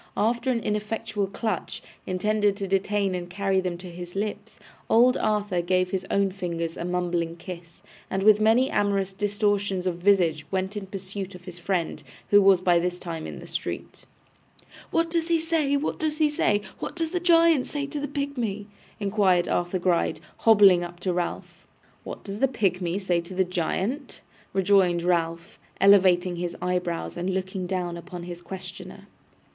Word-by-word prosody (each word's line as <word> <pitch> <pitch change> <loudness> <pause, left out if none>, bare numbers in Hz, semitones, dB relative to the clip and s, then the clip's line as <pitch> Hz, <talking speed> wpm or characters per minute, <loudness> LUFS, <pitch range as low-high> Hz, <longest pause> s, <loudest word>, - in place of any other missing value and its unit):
After 235 +4 +1
an 240 -2 +1
ineffectual 210 -1 -2
clutch, 215 +3 -4 0.2
intended 205 +2 +1
to 200 -2 -3
detain 195 0 +1
and 175 -1 -4
carry 195 +1 0
them 180 -2 -3
to 180 0 -9
his 175 +1 -9
lips, 210 +1 -4 0.3
old 245 +3 +5
Arthur 205 -4 0
gave 185 +1 +1
his 190 0 -2
own 200 -1 +2
fingers 170 -3 -3
a - - -5
mumbling 175 -2 -1
kiss, 170 -1 -10 0.3
and 190 0 -1
with 215 0 +6
many 230 +5 +4
amorous 195 -2 +1
distortions 205 -2 0
of 180 -2 -1
visage 175 -5 +3
went 190 +1 -2
in 200 -2 -5
pursuit 195 0 -6
of 180 0 -13
his 180 -1 -9
friend, 175 -1 -2 0.3
who 205 0 +8
was 195 -2 +5
by 175 -2 +4
this 180 +1 -1
time 165 -3 -6
in - - -7
the - - -10
street. - - -6 0.8
'What 330 0 +1
does 330 -1 0
he 335 -1 +2
say, 315 -3 +1
what 290 - -2
does 310 -1 -1
he 305 -1 +3
say? 205 -8 +1 0.2
What - - -5
does 325 -2 -2
the 360 - 0
giant 330 -5 +4
say 285 -1 -3
to 290 +1 -5
the 285 - -3
pigmy?' 255 -8 -3 0.3
inquired 195 -4 +2
Arthur 175 +1 0
Gride, 175 -3 +1 0.2
hobbling 200 -5 +6
up 175 0 -8
to 180 0 0
Ralph. 175 0 -4 0.4
'What - - -8
does 200 0 -6
the 270 - +4
pigmy 185 -7 0
say 180 -3 0
to 170 +2 -9
the 190 - +3
giant?' 190 - -2 0.3
rejoined 190 -3 +3
Ralph, 170 0 -1 0.2
elevating 185 -3 +5
his 175 0 -4
eyebrows 180 -2 -2
and 180 +2 -1
looking 185 -1 -3
down 175 -2 -2
upon 175 0 -8
his 175 0 -7
questioner. 185 +1 -9
190 Hz, 175 wpm, -26 LUFS, 180-210 Hz, 0.8 s, who